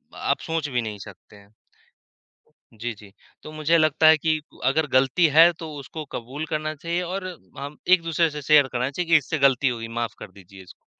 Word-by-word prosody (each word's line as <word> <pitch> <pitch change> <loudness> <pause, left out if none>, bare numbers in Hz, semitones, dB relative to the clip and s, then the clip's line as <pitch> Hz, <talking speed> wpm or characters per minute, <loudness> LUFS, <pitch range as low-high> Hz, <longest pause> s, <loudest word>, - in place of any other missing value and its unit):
आप - - -1
सोच 160 -2 -3
भी 125 -2 -1
नहीं 105 -3 -6
सकते 100 +1 -13
हैं। 100 +1 -19 1.2
जी, 115 +2 -5
जी। 105 -2 -16 0.3
तो 155 - -9
मुझे 155 +2 +1
लगता 155 0 +3
है 160 0 +7
कि 155 0 0 0.2
अगर 150 +4 +1
गलती 135 +6 +3
है 165 +2 +8
तो 160 -2 -7
उसको 145 +3 -8
कबूल 135 +6 -6
करना 155 0 -3
चाहिए 170 +4 -3
और 185 +2 -4 0.3
हम 145 +2 -7
एक-दूसरे 165 -2 +3
से 150 0 -6
शेयर 145 -1 +5
करना 125 +1 -1
चाहिए 170 +4 -4
कि 165 - +8
इससे 150 +2 -2
गलती 135 -1 +3
हो 125 -2 -1
गई 115 - -6
माफ़ 115 -1 -3
कर 100 - -10
दीजिए 95 0 -15
इसको। 90 - -18
145 Hz, 200 wpm, -23 LUFS, 120-160 Hz, 1.2 s, है